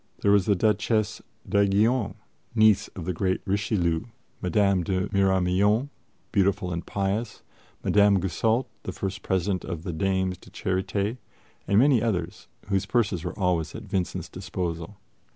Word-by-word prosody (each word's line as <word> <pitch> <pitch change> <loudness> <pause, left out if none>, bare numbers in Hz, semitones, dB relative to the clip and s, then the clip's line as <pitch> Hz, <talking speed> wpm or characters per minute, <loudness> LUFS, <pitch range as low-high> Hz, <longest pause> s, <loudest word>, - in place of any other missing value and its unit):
There 100 - +4
was 100 -2 +4
the 100 - +4
Duchesse 110 +2 +1 0.3
d'Aiguillon, 100 +3 +2 0.4
niece 110 -3 +5
of 90 - -6
the 90 - -1
great 95 +2 0
Richelieu; 95 -4 0 0.4
Madame 95 +1 +2
de 95 +2 -1
Miramion, 100 +5 +2 0.4
beautiful 95 -3 +1
and 85 - -3
pious; 100 +3 -2 0.4
Madame 100 -1 +4
Goussault, 110 +7 +1 0.2
the - - -5
first 95 0 -4
President 95 0 0
of 85 -2 -5
the 90 - -4
Dames 95 +1 0
de - - -16
Charité; 100 +4 -2 0.5
and 100 - +3
many 130 -1 +5
others, 90 -7 -2 0.2
whose 95 -2 0
purses 100 -8 +1
were 90 - -5
always 90 -5 0
at 110 - -7
Vincent's 95 -3 -2
disposal. 90 0 -5
95 Hz, 140 wpm, -26 LUFS, 90-105 Hz, 0.5 s, niece